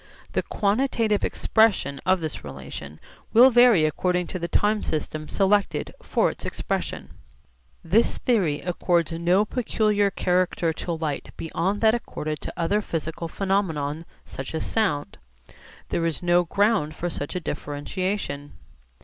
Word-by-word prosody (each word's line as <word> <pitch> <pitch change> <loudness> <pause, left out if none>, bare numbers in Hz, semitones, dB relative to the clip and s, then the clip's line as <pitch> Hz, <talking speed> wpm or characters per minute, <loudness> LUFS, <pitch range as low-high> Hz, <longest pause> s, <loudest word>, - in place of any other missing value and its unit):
The - - +1
quantitative 215 0 +1
expression 195 -11 +2
of 185 -1 +3
this 155 -1 -5
relation 70 +1 -8 0.3
will 250 +4 +8
vary 240 -9 +6
according 180 +3 0
to 185 - -4
the 170 - -2
time 210 +3 +2
system 155 0 -3
selected 195 -4 +1
for - - +1
its - - -12
expression. - - -3 0.7
This 200 +8 +2
theory 185 - +1
accords 175 -1 0
no 175 +5 +2
peculiar 215 -3 +1
character 180 -3 +1
to 170 - -5
light 160 -3 -3
beyond 180 +5 -2
that 220 -1 +5
accorded 155 -10 -4
to - - -6
other 185 +5 +1
physical 165 -2 -4
phenomena 165 -5 -1 0.2
such 135 +4 -6
as 160 - -2
sound. 170 - -1 0.7
There 165 -1 0
is 165 +1 -3
no 175 0 +3
ground 200 -5 +1
for 175 - -3
such 145 +1 -5
a - - 0
differentiation. 145 0 -4
175 Hz, 135 wpm, -25 LUFS, 155-205 Hz, 0.7 s, will